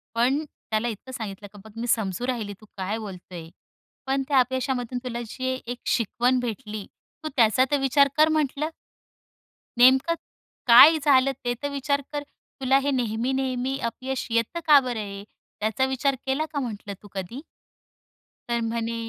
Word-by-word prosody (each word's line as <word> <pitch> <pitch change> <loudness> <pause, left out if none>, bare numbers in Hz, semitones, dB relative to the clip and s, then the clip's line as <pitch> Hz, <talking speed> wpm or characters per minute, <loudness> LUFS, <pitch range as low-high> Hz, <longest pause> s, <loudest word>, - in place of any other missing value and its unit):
पण 260 +6 +2
त्याला 220 -5 -3
इतकं 235 +3 -6
सांगितलं, 205 -5 -6
का 205 - -12
"बघ, 220 - -12
मी 240 - -3
समजू 220 0 0
राहिली, 225 -5 -2
तू - - -14
काय 195 +3 -2
बोलतोय? 180 -5 -9 0.6
पण 270 0 +1
त्या 280 -2 +4
अपयशामधून 255 -1 -1
तुला 240 -2 -4
जी 260 +3 -3
एक 245 +1 -5
शिकवण 245 +3 +1
भेटली, 215 -4 -5 0.4
तू 310 - -3
त्याचा 235 +2 +5
तर 290 - +4
विचार 275 +1 +4
कर" 310 +1 +6
म्हटलं. 300 +1 -1 1.1
"नेमकं 265 +6 +6 0.5
काय 275 +7 +9
झालं? 275 -2 +5
ते 245 0 0
तर 285 - -1
विचार 280 0 0
कर. 290 -1 -2
तुला 270 -2 -1
हे 280 +1 0
नेहमी-नेहमी 255 +2 -1
अपयश 260 +2 -4
येतं 230 +9 0
का 300 -2 +9
बरं 245 -4 -3
हे? 200 -1 -7 0.4
त्याचा 220 +4 +1
विचार 265 +1 0
केला 270 +4 0
का?" 285 - -1
म्हटलं, 210 -5 -5
"तू 205 - -13
कधी?" 195 +8 -5 1.1
तर 235 0 0
म्हणे 230 0 -2
250 Hz, 155 wpm, -25 LUFS, 220-270 Hz, 1.1 s, काय